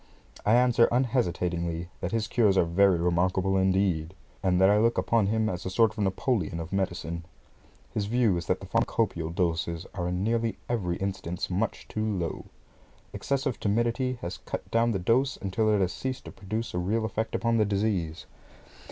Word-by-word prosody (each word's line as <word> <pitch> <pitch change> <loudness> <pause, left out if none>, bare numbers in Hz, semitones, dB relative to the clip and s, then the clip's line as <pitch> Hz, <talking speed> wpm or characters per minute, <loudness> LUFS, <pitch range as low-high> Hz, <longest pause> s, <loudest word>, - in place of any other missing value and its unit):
I 110 - +6
answer 120 -1 +5
unhesitatingly, 90 -9 0
that 90 - -3
his 115 -2 0
cures 105 -6 +3
are 85 - +4
very 95 +2 +4
remarkable, 90 +3 +1
indeed, 95 -3 +1 0.3
and 90 -2 +2
that 95 - +6
I 105 +1 +5
look 115 +2 +2
upon 115 -4 +2
him 110 +1 +1
as 90 -2 -3
a - - -3
sort 110 +3 +3
of 105 -1 -3
Napoleon 95 - 0
of 85 +3 -6
medicine. 85 -3 -2 0.7
His 105 -1 -1
view 115 -3 +2
is 85 -2 -4
that - - 0
the - - -7
pharmacopaeal 80 -1 0
doses 85 -2 -1
are 90 -2 -2
in 90 +1 -1
nearly 115 +1 0
every 95 -8 -1
instance 95 -2 -3
much 100 +5 -2
too 110 - -3
low. 95 -6 -2 0.7
Excessive 135 -2 -1
timidity 120 +4 0
has 85 - -5
cut - - -6
down 115 +1 +3
the 100 - 0
dose 120 +9 +1
until 105 +3 0
it 105 -2 +3
has 90 -1 0
ceased 130 +4 -4
to - - -8
produce 110 +3 -4
a 90 - -1
real 110 +5 0
effect 110 +1 -2
upon 115 0 +1
the 110 - +3
disease. 100 -6 -1
100 Hz, 180 wpm, -28 LUFS, 90-115 Hz, 0.7 s, I